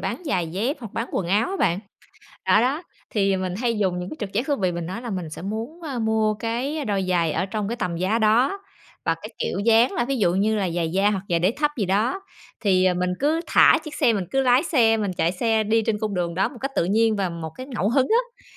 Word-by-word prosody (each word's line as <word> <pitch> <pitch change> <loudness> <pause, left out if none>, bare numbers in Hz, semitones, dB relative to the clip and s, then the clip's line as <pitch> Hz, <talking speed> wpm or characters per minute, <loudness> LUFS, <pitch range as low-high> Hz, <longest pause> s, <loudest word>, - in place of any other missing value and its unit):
bán - - -4
giày 185 - 0
dép 215 - -2
hoặc 225 -5 -8
bán 230 - -3
quần 185 - -1
áo 205 +6 +2
á 390 - -2
bạn. 170 +2 +2 0.7
Đó, - - +5
đó, 270 +7 0 0.3
thì, 195 -2 +1
ờ, 190 - 0
mình 185 -1 -3
hay 235 -3 0
dùng 185 -3 0
những 180 0 -5
cái - - -7
trực 200 -3 -4
giác 235 +6 -1
thú 285 -2 +1
vị, 185 -2 0
mình 170 -1 -4
nói 190 +7 -5
là 240 - -5
mình 180 -5 -4
sẽ 160 - -8
muốn, 225 - -5
a, 280 -6 -4
mua 220 -1 +1
cái 245 +8 -3
đôi 200 -4 -1
giày 170 -3 +1
ở 185 - -1
trong 205 0 -3
cái 235 - -3
tầm 180 -6 -2
giá 190 +6 +1
đó 235 - +3 0.5
và - - +2
cái - - -9
kiểu 470 - -2
dáng 230 +4 +4
là 240 - 0
ví 270 +2 -1
dụ 175 -5 +2
như 215 +3 +2
là 190 -4 0
giày 165 -1 -1
da 195 +2 +3
hoặc 195 -3 -2
giày 170 - +2
đế 180 +3 +2
thấp 295 -1 +1
gì 205 - +1
đó. 215 - +1 0.4
Thì, 190 -4 +3
ờ, 185 -1 +3
mình 180 0 0
cứ 305 +4 +2
thả - - +6
chiếc 305 - -7
xe, 255 -7 +3
mình 200 -4 -1
cứ 270 - +1
lái 255 0 +4
xe, 235 -9 +3
mình 205 -3 -1
chạy 170 -1 0
xe 220 +3 +1
đi 225 +2 +2
trên 215 -2 0
cung 215 -1 -2
đường 175 -2 -2
đó 190 +3 +1
một 260 - -12
cách 270 - -2
tự - - +3
nhiên 220 +4 +2
và 195 -2 0
một 165 -2 -6
cái 255 - -7
ngẫu 230 -7 -1
hứng 260 +3 +3
á 485 +2 0
215 Hz, 275 wpm, -23 LUFS, 185-245 Hz, 0.7 s, thả